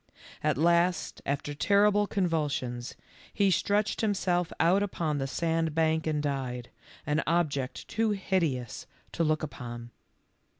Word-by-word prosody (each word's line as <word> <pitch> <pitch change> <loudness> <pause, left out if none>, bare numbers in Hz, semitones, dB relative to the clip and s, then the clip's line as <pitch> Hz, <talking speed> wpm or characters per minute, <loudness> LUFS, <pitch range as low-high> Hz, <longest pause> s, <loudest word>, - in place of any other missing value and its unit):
At - - +1
last, 170 +3 +2
after 145 +1 -2
terrible 205 +5 +3
convulsions, 145 - -1 0.4
he 200 -2 +2
stretched 205 +3 +1
himself 180 -5 +1
out 185 +4 +4
upon 165 -7 -1
the 135 - -1
sandbank 160 0 0
and 150 -1 0
died, 130 -4 -3 0.3
an 150 +2 +1
object 150 -6 0
too 225 0 0
hideous 170 - -1 0.2
to 170 - 0
look 155 -1 +1
upon. 120 -4 -7
160 Hz, 120 wpm, -29 LUFS, 140-185 Hz, 0.4 s, out